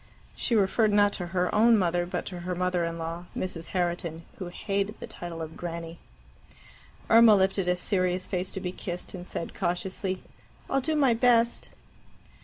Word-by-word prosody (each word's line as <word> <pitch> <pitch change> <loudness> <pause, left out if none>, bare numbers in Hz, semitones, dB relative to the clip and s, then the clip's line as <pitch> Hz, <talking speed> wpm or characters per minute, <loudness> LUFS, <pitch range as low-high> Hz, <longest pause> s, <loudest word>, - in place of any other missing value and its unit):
She 235 - 0
referred 210 +1 +3
not 205 0 +4
to 175 - -3
her 180 +1 0
own 225 +2 +6
mother, 175 -2 +1
but - - -3
to 180 -2 -6
her 180 +1 -3
mother 180 -1 0
in 165 0 -4
law, 165 +1 -5
Mrs. 170 -3 -4
Herriton, 175 -2 -2 0.2
who 185 - -4
hated 200 +3 -2
the - - -6
title 170 -2 -6
of 160 0 -8
Granny. 170 -1 -6 1.1
Irma 225 -1 +8
lifted 190 -1 +2
a 180 - +3
serious 185 -1 0
face 185 -1 -2
to - - -3
be 180 -1 -3
kissed, 180 -1 -6
and 180 -1 -7
said 170 - -4
cautiously, 185 +1 -2 0.4
"I'll 270 - +1
do 315 +4 0
my 275 -5 +4
best." 235 0 +3
185 Hz, 175 wpm, -28 LUFS, 175-205 Hz, 1.1 s, Irma